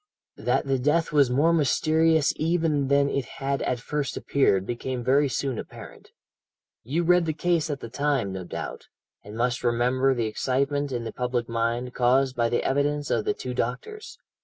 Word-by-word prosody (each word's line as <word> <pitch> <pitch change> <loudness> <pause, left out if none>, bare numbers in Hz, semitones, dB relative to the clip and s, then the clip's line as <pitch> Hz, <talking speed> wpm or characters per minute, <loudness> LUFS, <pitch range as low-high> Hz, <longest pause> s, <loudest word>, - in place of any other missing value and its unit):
"That - - 0
the 135 -1 0
death 150 +5 +1
was 145 -4 +4
more 145 +7 +3
mysterious 160 0 +2
even 160 -3 0
than 140 +1 +3
it 140 -2 -1
had 135 0 -2
at 125 - -1
first 145 +4 -3
appeared 95 -9 +1
became 120 +2 -4
very 140 +3 +3
soon 130 -1 -2
apparent. - - -11 0.7
You 150 +9 -1
read 180 0 +4
the 155 - 0
case 165 0 0
at 140 -2 -4
the - - -6
time, 135 -4 -1
no 95 -1 -5
doubt, 85 - -7 0.4
and 105 +2 -9
must 125 +1 0
remember 125 +3 +2
the 120 -2 -1
excitement 140 +5 -1
in 120 -2 -3
the 115 - -6
public 125 -1 -2
mind 115 +2 -2
caused 130 +2 +2
by 115 -1 +1
the 120 - 0
evidence 145 +2 0
of - - 0
the 420 0 0
two 440 - -5
doctors. 430 -2 -4
135 Hz, 180 wpm, -25 LUFS, 120-150 Hz, 0.7 s, was